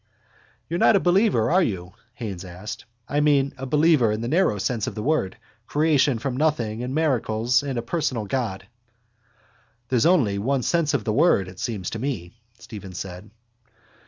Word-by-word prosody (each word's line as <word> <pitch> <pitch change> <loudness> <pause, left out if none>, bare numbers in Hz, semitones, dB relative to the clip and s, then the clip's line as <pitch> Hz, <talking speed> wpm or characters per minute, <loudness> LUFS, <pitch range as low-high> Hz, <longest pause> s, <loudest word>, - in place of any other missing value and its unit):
—You're 170 +2 -2
not - - +5
a - - +5
believer, 180 - +2
are 185 +2 +4
you? 95 - -3 0.2
Haines 100 -8 -6
asked. 95 +3 -8 0.2
I 145 - 0
mean, 145 -2 +3
a 135 +1 -6
believer 150 -5 +4
in 105 +1 -2
the 115 - -3
narrow 160 - +2
sense 110 +2 -1
of - - -5
the 105 - -4
word. 145 -9 0 0.3
Creation 145 -4 +2
from 125 +2 -3
nothing 120 -8 0
and 125 +2 -4
miracles 120 -6 +1
and 140 -3 -4
a 120 - -2
personal 125 -5 -2
God. 100 -5 -3 1.2
—There's 125 +2 +3
only 125 - +3
one 130 +4 0
sense 165 -1 +1
of 125 - -1
the 110 - -1
word, 105 - +3
it 90 0 -11
seems 100 -6 -3
to 115 - -4
me, 110 -10 -4 0.3
Stephen 100 -5 -10
said. 90 +3 -7
120 Hz, 175 wpm, -24 LUFS, 105-150 Hz, 1.2 s, not